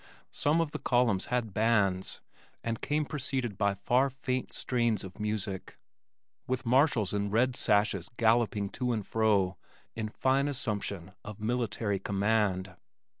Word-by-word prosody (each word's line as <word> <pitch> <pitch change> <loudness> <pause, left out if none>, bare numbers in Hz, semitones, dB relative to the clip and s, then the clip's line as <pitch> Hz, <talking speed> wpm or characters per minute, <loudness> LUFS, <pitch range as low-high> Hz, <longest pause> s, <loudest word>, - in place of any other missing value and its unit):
Some 150 +3 +1
of 160 -3 -2
the - - -4
columns 120 -6 +2
had 120 -5 -1
bands 100 -4 +1 0.4
and 115 -1 -3
came 150 +1 0
preceded 130 -6 -2
by 100 0 +1
far 125 +7 +2
faint 130 -1 -3
strains 120 -5 0
of 95 +1 -10
music, 105 -2 -3 0.7
with 130 +1 -2
marshals 125 - +3
in 100 0 0
red 120 +4 +2
sashes 100 -5 +2
galloping 110 -3 +2
to 125 +3 -1
and 110 -3 -2
fro 100 -5 +2 0.4
in 110 -1 -3
fine 135 +5 +1
assumption 105 -9 -3
of 105 -1 -8
military 110 -3 -1
command. 100 -2 0
110 Hz, 135 wpm, -30 LUFS, 100-125 Hz, 0.7 s, marshals